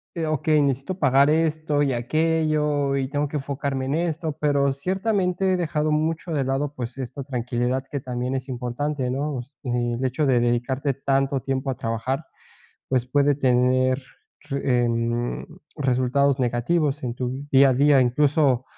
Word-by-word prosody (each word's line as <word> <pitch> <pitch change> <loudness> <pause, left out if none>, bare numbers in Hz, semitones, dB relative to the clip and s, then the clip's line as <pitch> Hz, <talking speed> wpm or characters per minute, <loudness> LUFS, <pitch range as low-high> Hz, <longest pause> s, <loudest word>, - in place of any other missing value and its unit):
eh, 165 -2 -1
okey, 155 0 +2
necesito 140 +6 -1
pagar 140 -3 +4
esto 155 -2 +1
y 135 -2 +1
aquello, 150 +1 +1
y 135 -1 -1
tengo 145 +1 -1
que 150 - -3
enfocarme 140 -1 -3
en 135 - -1
esto, 160 -2 -2
pero 140 -2 +2
ciertamente 185 +4 0
he - - +1
dejado 155 -3 0
mucho 160 +3 -1
de 145 -4 0
lado, 135 +2 -1
pues, 125 -1 -6
esta 130 +1 -5
tranquilidad 125 0 -2
que 140 - -2
también 125 0 -3
es 130 0 -4
importante, 125 +2 -2
¿no?, 140 +3 -2
o 125 - -3
sea, 140 +4 -24
el 120 0 -1
hecho 130 +4 0
de 130 -3 +3
dedicarte 125 +4 0
tanto 135 0 0
tiempo 135 +1 -2
a 130 - -1
trabajar, 115 +6 -3 0.6
pues, 130 -2 +1
puede 145 +3 +2
tener 130 0 +2 0.5
re 135 -3 +1
em, 120 +1 -1 0.3
resultados 135 0 +1
negativos 135 +5 0
en 120 -2 -3
tu 130 +2 -4
día 135 0 +6
a - - +2
día. 140 +1 +5
Incluso 135 0 +2
135 Hz, 165 wpm, -24 LUFS, 125-150 Hz, 0.6 s, día